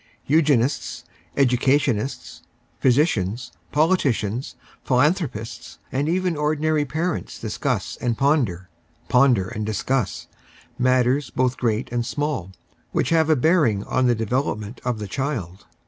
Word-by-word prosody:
Eugenists, 145 -4 +1 0.3
educa 130 0 +4
tionists, 135 -3 -3 0.4
physicians, 120 - +1 0.2
politicians, 135 - +1 0.3
philanthropists, 135 - 0
and 140 +4 0
even 180 0 0
ordinary 150 0 +1
parents 160 +5 -3
discuss - - -2
and 120 -2 -1
ponder, 125 - +1 0.4
ponder 125 -7 +4
and 105 - -4
discuss, 110 -1 -1 0.5
matters 130 +2 +2
both 130 0 0
great 115 -1 -1
and 120 -1 0
small 130 - -3 0.4
which - - 0
have 160 -1 +3
a 155 - +5
bearing 140 - +2
on 130 +2 +1
the 120 - +3
development 115 -1 -2
of 125 -2 -1
the 105 -1 -5
child. 105 - -4
130 Hz, 115 wpm, -23 LUFS, 115-150 Hz, 0.5 s, a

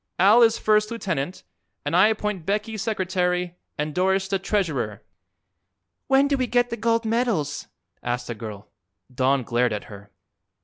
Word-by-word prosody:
Al 205 +6 +6
is 230 -1 +5
first 215 0 +2
lieutenant, 180 -8 -3 0.4
and 145 +3 0
I 185 +4 +7
appoint 210 -4 -2
Becky 210 +5 -2
secretary 180 -4 -1 0.2
and 150 +1 -2
Doris 190 +2 +1
the 195 0 0
treasurer." 160 - -1 1.0
"When 270 +1 +4
do 280 -1 +1
we 255 -1 0
get 245 0 +1
the - - -1
gold 230 0 0
medals?" 220 - -1 0.3
asked 120 0 -3
a 120 - -3
girl. 105 -2 -8 0.5
Don 130 +1 +2
glared 120 0 +1
at 105 - -4
her. 100 +1 -12
190 Hz, 150 wpm, -24 LUFS, 140-220 Hz, 1.0 s, I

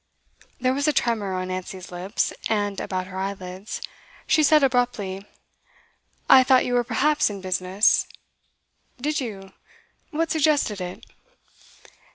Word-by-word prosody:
There 255 +1 +1
was 285 +3 0
a 300 - +3
tremor 215 -8 0
on 185 0 -3
Nancy's 185 0 -6
lips, 180 +4 -2 0.2
and 205 -2 0
about 185 -1 -3
her 185 0 -7
eyelids. 190 0 -5 0.4
She 310 0 +3
said 305 0 +5
abruptly: 240 -7 0 1.0
'I 260 -1 +8
thought 255 0 +4
you 245 - -2
were 245 0 +3
perhaps 295 +4 +2
in 200 -1 -6
business?' 185 +2 +2 0.9
'Did 300 +4 -1
you? 195 -7 -7 0.6
What 325 0 -1
suggested 290 - +1
it? 180 0 -7
210 Hz, 130 wpm, -24 LUFS, 190-265 Hz, 1.0 s, I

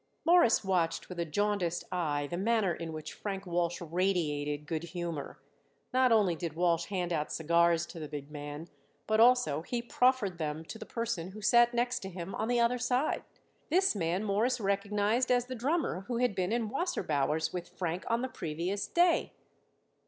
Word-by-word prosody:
Morris 340 -12 +5
watched 180 -4 0
with 180 -1 -7
a 170 - 0
jaundiced 180 0 0
eye 150 -5 -1
the 160 - -4
manner 205 -1 +1
in 165 0 -6
which 155 -1 -7
Frank 195 -2 -5
Walsh 175 -1 -1
radiated 155 -4 -1
good 160 +1 -2
humor. 170 -3 -5 0.6
Not 255 -1 +4
only 205 -6 +4
did 165 -1 -5
Walsh 170 -1 +2
hand 180 -3 -2
out 150 -2 -1
cigars 170 +1 +3
to 170 - -10
the 155 - -5
big 145 -1 -7
man, 145 +2 -7 0.4
but 220 0 +1
also 230 - +5
he 240 +8 -3
proffered 240 -6 +1
them 155 0 -3
to 220 - -8
the - - -8
person 220 -7 -3
who 215 - -9
sat 240 +2 +5
next 245 +1 +1
to 190 - -7
him 180 0 -6
on 220 - -2
the 245 0 +2
other 235 +1 +2
side. 250 +4 0 0.5
This 370 - +3
man 175 +1 -1
Morris 215 +5 +1
recognized 205 +4 +1
as 245 -1 +3
the 255 - -6
drummer 255 - -1
who 240 -1 -2
had 245 -3 +2
been 185 0 -1
in 230 -2 0
Wasserbauer's 160 - 0
with 180 -1 -5
Frank 175 0 -3
on 235 +1 +1
the - - 0
previous 175 -1 -3
day. 345 -1 +2
190 Hz, 180 wpm, -31 LUFS, 165-235 Hz, 0.6 s, Morris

